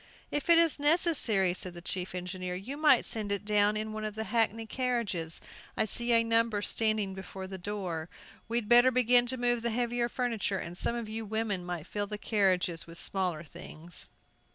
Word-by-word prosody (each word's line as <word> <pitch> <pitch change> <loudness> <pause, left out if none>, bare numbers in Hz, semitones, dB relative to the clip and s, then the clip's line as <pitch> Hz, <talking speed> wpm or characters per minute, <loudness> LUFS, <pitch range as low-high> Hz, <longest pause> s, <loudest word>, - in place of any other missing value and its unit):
"If 295 +4 -2
it 335 - +8
is 330 -3 +4
necessary," 285 - +3
said 180 -1 -5
the 175 - -9
chief 180 0 -3
engineer, 180 0 -4
"you 215 +10 -6
might 295 -4 +4
send 215 -2 -1
it 200 0 -2
down 210 0 +2
in 215 0 -3
one 215 0 -5
of 215 -1 -4
the 220 - -3
hackney 225 -1 0
carriages. 220 -9 -2 0.4
I - - +2
see 235 +3 +1
a 230 0 +6
number 230 -2 +1
standing 215 -4 +1
before 190 0 -8
the 190 0 -8
door. 180 -4 -4 0.4
We'd 230 -1 -1
better 240 +2 +7
begin 245 -1 +4
to 260 +1 -2
move 240 -1 +1
the 235 - -1
heavier 240 +1 -1
furniture, 230 -6 -1
and 175 -1 -6
some 235 - -2
of 235 -2 -4
you 220 +1 -5
women 215 -3 -2
might 175 -3 -5
fill 205 +2 -3
the 210 0 -5
carriages 185 -6 +1
with 165 0 -10
smaller 180 -5 -1
things." 165 +1 -7
215 Hz, 195 wpm, -30 LUFS, 185-235 Hz, 0.4 s, it